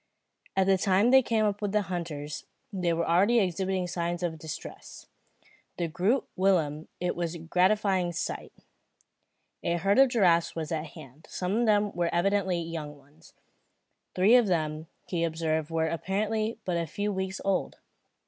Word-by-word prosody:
At 190 - +4
the 190 -1 +3
time 195 +5 +3
they 265 0 +8
came 225 -3 +1
up 205 0 -1
with 205 -1 -2
the 210 -1 +2
hunters, 165 -5 -5 0.3
they 180 -3 0
were 165 0 0
already 195 +8 +4
exhibiting 185 -1 0
signs 175 0 -3
of 160 -2 -2
distress. 155 0 -9 0.7
To 170 - -1
Groot 195 - 0
Willem 165 -5 +1
it 180 - -1
was 170 -1 -3
a - - -5
gratifying 185 +2 +1
sight. 170 - -4 1.1
A 170 0 0
herd 195 +6 +2
of 270 -1 +7
giraffes 175 -8 +3
was 160 -1 -4
at 160 0 -2
hand. 150 -1 -13
Some 185 +2 -2
of 240 +1 +2
them 205 -1 +3
were 175 -2 -1
evidently 190 0 +1
young 160 -3 -6
ones. 145 +4 -21 0.8
Three 190 +5 +5
of 240 -4 +5
them 155 -3 -1 0.2
he 170 -2 -2
observed 160 -1 -1
were 165 -1 0
apparently 215 +6 -1
but 180 -2 0
a 170 -1 -2
few 205 +6 -2
weeks 190 0 -3
old. 195 -1 0
180 Hz, 165 wpm, -28 LUFS, 165-200 Hz, 1.1 s, they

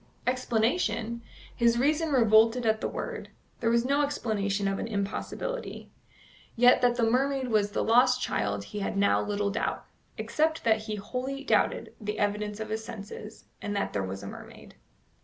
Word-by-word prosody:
Explanation? 235 -2 0 0.3
His 235 0 +3
reason 305 +5 +2
revolted 230 -1 +4
at 220 0 +2
the - - 0
word. - - -5 0.3
There 230 - +1
was 235 +1 +2
no 280 +2 +2
explanation 210 -8 -1
of 195 0 -1
an - - -3
impossibility. 220 - -4 0.6
Yet 245 +2 +6
that 245 -1 +3
the 240 - 0
mermaid 260 +3 +1
was 210 -2 +2
the 205 - -1
lost 250 +2 +4
child 100 - -1
he 210 - -6
had 195 - -2
now 200 0 +3
little 205 -1 -1
doubt, - - -2 0.3
except 315 +1 0
that 220 -1 +3
he 215 -1 -3
wholly 260 +6 -4
doubted - - +1
the 210 0 -3
evidence 210 0 -1
of 220 -1 -5
his 220 +1 -3
senses, 215 -1 -9 0.2
and 205 - -3
that 200 - -1
there 100 - 0
was 95 +1 -5
a - - -6
mermaid. - - -11
225 Hz, 170 wpm, -28 LUFS, 205-250 Hz, 0.6 s, Yet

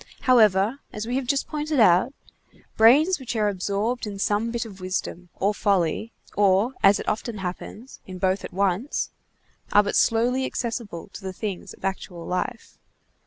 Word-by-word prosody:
However, 220 -1 +4
as 210 +1 -5
we 245 +2 -2
have 265 -2 -3
just 275 +1 0
pointed 300 -1 -2
out, 185 +3 +5 0.6
brains 295 +11 +5
which 255 -3 -5
are 215 -2 +2
absorbed 205 +5 -2
in 200 -1 -6
some 210 +3 0
bit 235 0 -3
of 195 -4 -11
wisdom, 185 -1 -4
or 200 +2 +1
folly, 200 +1 0 0.2
or, 200 +4 +3
as 195 +1 +5
it - - -7
often 220 +1 -2
happens, 195 +6 -7
in 185 -1 -7
both 190 +1 0
at - - -7
once, 195 +7 -1 0.6
are 205 - +6
but 200 - -2
slowly 245 +3 +2
accessible 230 -9 -4
to - - -10
the 190 -1 -5
things 200 -1 -5
of - - -9
actual 180 -3 -4
life. 230 +6 -4
210 Hz, 165 wpm, -24 LUFS, 190-240 Hz, 0.6 s, are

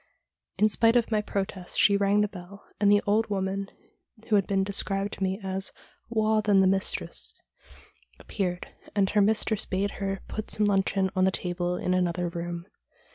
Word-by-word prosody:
In 215 - +5
spite 225 +2 +4
of 235 -1 +2
my 215 -1 +2
protests 195 -3 -4
she 200 - +5
rang 200 +1 +3
the 210 - +2
bell, 195 0 -12
and 205 -1 +4
the 205 0 +4
old 215 +2 +2
woman 195 0 -2 0.6
who 215 - +3
had 200 -2 +2
been 195 -1 +1
described 195 0 -1
to - - -9
me 190 +1 -1
as 190 0 -3 0.2
' - - -37
waur 220 -1 +2
than 205 -2 +3
the 190 - +5
mistress 190 +1 -2 0.4
' - - -28
appeared, 180 -3 -3 0.3
and 195 -2 +2
her 210 - +3
mistress 215 +1 +1
bade 195 +1 -1
her 195 0 -2
put 215 - -5
some 210 - +2
luncheon 195 -1 +1
on 185 0 +3
the - - +4
table 175 -1 -2
in 180 - -1
another 180 -1 0
room. 170 0 -5
195 Hz, 185 wpm, -27 LUFS, 190-210 Hz, 0.6 s, In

